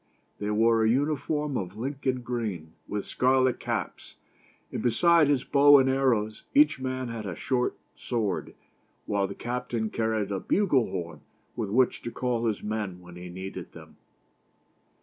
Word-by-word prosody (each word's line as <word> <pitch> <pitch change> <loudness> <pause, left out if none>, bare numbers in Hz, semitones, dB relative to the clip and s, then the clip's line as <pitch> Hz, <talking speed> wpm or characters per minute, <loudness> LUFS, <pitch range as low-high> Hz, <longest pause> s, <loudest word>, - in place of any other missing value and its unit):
They 105 - -2
wore 115 +1 +3
a 110 - +3
uniform 145 +2 0
of 95 +1 -5
Lincoln 130 +1 -2
green, 105 -10 -4
with 105 -1 -3
scarlet 130 0 +2
caps; - - -4 0.6
and - - -3
besides 155 +6 +4
his 140 -3 +2
bow 145 0 +7
and 135 -1 +4
arrows, 125 -5 +1
each 295 - +5
man 130 -1 -3
had 110 -3 -5
a 90 - -4
short 125 -2 -1 0.2
sword; 115 -5 -2 0.5
while 100 -1 0
the 100 - -7
captain 120 -2 -3
car 110 -1 0
ried 105 -2 -1
a 95 - -1
bugle 160 - +2
horn 85 -4 -5 0.3
with 110 -4 -3
which 125 +4 +2
to - - -5
call 120 -1 -1
his 110 -3 -2
men 105 -4 -3
when 90 -1 -13
he 90 0 -8
needed 95 0 -7
them. 80 -2 -14
115 Hz, 160 wpm, -27 LUFS, 100-130 Hz, 0.6 s, bow